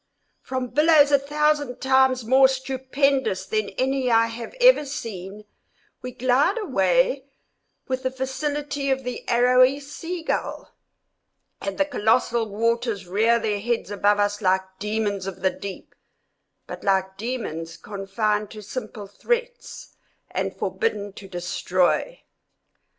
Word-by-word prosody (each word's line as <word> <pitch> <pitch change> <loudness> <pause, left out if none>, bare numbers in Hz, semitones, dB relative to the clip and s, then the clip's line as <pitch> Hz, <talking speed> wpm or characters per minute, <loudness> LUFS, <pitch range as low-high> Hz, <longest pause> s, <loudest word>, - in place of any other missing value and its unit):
From 255 -1 -4
billows 300 0 +5
a 280 - +5
thousand 295 -2 0
times 265 -2 +3
more 265 +3 +6
stupendous 265 -5 0
than 215 +1 -1
any 260 0 0
I 230 -1 +5
have 230 - -7
ever - - +6
seen, 210 -8 -7 0.6
we 250 - -6
glide 260 - +2
away - - +1 0.6
with 260 0 -2
the 260 - 0
facility 280 +2 -3
of 265 0 0
the 250 0 -5
arrowy 255 +3 +4
sea 330 +5 -6
gull; - - -3 0.9
and 195 -1 -4
the 290 - +3
colossal 235 -3 +1
waters 230 -1 -1
rear 220 +6 +3
their 215 -3 -1
heads 230 -1 -2
above 205 0 +2
us 205 0 0
like 190 -1 +2 0.2
demons 205 -2 -2
of 190 -1 -7
the 190 - +3
deep, 195 0 -9 0.7
but - - -9
like 190 -1 +1
demons 195 -8 -5
confined 210 +1 -2
to 215 -1 -10
simple 210 0 -6
threats 480 - -4 0.4
and - - -2
forbidden 205 - -2
to 195 - -11
destroy. 180 - -1
245 Hz, 130 wpm, -24 LUFS, 205-275 Hz, 0.9 s, more